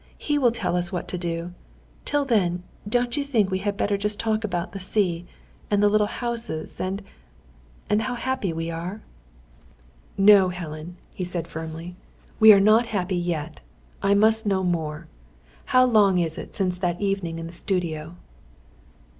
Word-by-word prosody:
He 295 -1 0
will 245 -4 +4
tell 190 -7 -2
us 175 -1 -1
what 180 -3 -4
to 180 - -3
do. 170 0 -4 0.5
Till 290 -1 +1
then, 180 -8 +1 0.3
don't 245 +2 +1
you 290 - +1
think 225 -9 +1
we 185 - 0
had 200 +1 -2
better 205 -1 0
just 210 0 0
talk 220 -1 0
about 175 -5 -3
the 195 - -7
sea, 180 -3 0 0.4
and 205 0 +2
the 205 - +6
little 210 0 +3
houses, 230 -9 -4
and 195 +2 -3 0.8
and 210 +1 +2
how 245 +3 -2
happy 255 -6 -2
we 165 +1 -3
are?" 175 +6 -5 1.2
"No, 195 -1 +7
Helen," 170 -1 -7 0.2
he 185 - -4
said 175 -2 -3
firmly. 160 +2 -7 0.4
"We 220 -1 +10
are 200 - +7
not 215 +4 +4
happy 190 -4 -1
yet. 165 -3 -3 0.4
I 200 0 +3
must 220 +1 +5
know 190 -2 +1
more. 160 -3 -2 0.6
How 255 0 +5
long 210 -6 +4
is 165 -2 0
it - - -9
since 180 -2 -1
that 175 -2 -1
evening 195 -5 -2
in 165 - -5
the 165 - -9
studio?" 170 -3 -2
190 Hz, 170 wpm, -24 LUFS, 170-215 Hz, 1.2 s, We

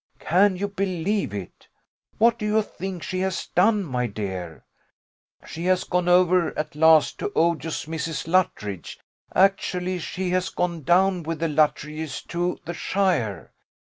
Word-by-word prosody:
Can 190 +4 +3
you 200 +3 -2
believe 195 - -1
it? 100 -3 -8 0.5
What 235 +1 +4
do 210 - -3
you 215 +1 +2
think 190 -3 -7
she 185 - -3
has 190 -1 -2
done, 205 +3 +2
my 125 -6 -2
dear? 95 -6 -6 0.8
She 165 +2 -6
has 185 0 +2
gone 180 -1 -1
over 180 -1 +3
at 155 -1 -3
last 160 0 +5
to - - -3
odious 165 -1 0
Mrs. 160 0 -4
Luttridge 105 - -1 0.4
actually 185 -1 +2
she 180 +2 -3
has 185 0 0
gone 175 -2 -2
down 180 +4 +3
with 165 -1 -4
the 165 - 0
Luttridges 150 -1 -1
to 175 +1 -1 0.2
shire. 175 - -1
175 Hz, 140 wpm, -24 LUFS, 155-185 Hz, 0.8 s, last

